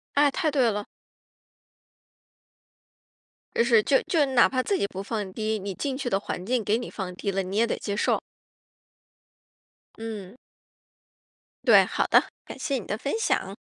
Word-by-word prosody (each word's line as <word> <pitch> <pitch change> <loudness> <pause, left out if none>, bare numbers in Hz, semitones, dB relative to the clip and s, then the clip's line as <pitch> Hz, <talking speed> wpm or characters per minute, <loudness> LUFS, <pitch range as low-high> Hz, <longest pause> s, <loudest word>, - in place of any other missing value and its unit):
哎， 290 0 +5
太 315 +2 0
对 260 -5 +3
了。 205 -1 -3 2.7
就 - - +4
是 235 -3 +4
就 270 - +3
就 320 -4 +3
哪 260 -3 +5
怕 255 -1 0
自 395 +7 0
己 - - +1
不 195 -1 -6
放 205 -2 -4
低， 220 +1 -2
你 195 -1 -5
进 270 +6 -3
去 270 -2 -3
的 195 - +1
环 185 -2 -5
境 240 +1 0
给 215 +2 +2
你 245 - -6
放 185 -3 -5
低 200 - -2
了， 195 0 -1
你 190 +2 -5
也 230 +2 +4
得 - - -1
接 200 - -3
受。 210 - +1 1.8
嗯。 220 -2 -7 1.3
对， - - +7
好 - - -1
的。 - - +6 0.2
感 - - -9
谢 280 - -2
你 220 - -8
的 210 - -3
分 275 - -3
享。 - - 0
225 Hz, 180 characters per minute, -26 LUFS, 200-260 Hz, 2.7 s, 对